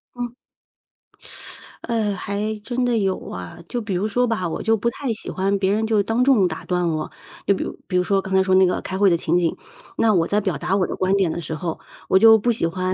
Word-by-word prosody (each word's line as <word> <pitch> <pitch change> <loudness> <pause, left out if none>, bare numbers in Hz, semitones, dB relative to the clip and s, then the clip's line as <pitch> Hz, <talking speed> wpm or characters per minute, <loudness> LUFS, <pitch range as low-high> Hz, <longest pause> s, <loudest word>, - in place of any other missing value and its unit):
嗯。 245 -1 -5 1.5
呃， 225 -4 0
还 200 +3 -3
真 245 +3 -2
的 245 -1 +1
有 195 -3 0
啊。 90 -1 -7
就 240 - -2
比 205 -3 -4
如 185 +4 0
说 245 +4 +1
吧， 215 -6 -1
我 165 - -4
就 225 0 +2
不 225 +2 0
太 255 +1 -4
喜 220 - -5
欢 195 +2 0
别 195 0 +1
人 220 +1 0
就 215 -2 +2
当 225 +4 +1
众 250 -8 +4
打 160 -2 -6
断 180 -1 0
我。 155 -1 -2 0.4
就 200 - +4
比 - - -3
如 - - -6
比 185 - -3
如 180 - +3
说， 195 +1 +1
刚 190 0 -6
才 190 0 +4
说 190 0 +1
那 190 0 +6
个 180 - 0
开 190 - -4
会 200 0 +5
的 170 - +3
情 165 +1 +1
景， 170 -2 +1 0.4
那 220 -1 +3
我 170 -4 +2
在 210 +1 +1
表 190 -7 -1
达 180 +5 -1
我 190 -2 +2
的 - - -4
观 185 +1 +1
点 190 -4 +2
的 170 - -4
时 160 -1 -5
候， 165 0 -4 0.3
我 190 - +5
就 225 +1 +8
不 240 +3 +1
喜 215 -7 0
欢 185 +2 -2
195 Hz, 275 characters per minute, -22 LUFS, 180-220 Hz, 1.5 s, 就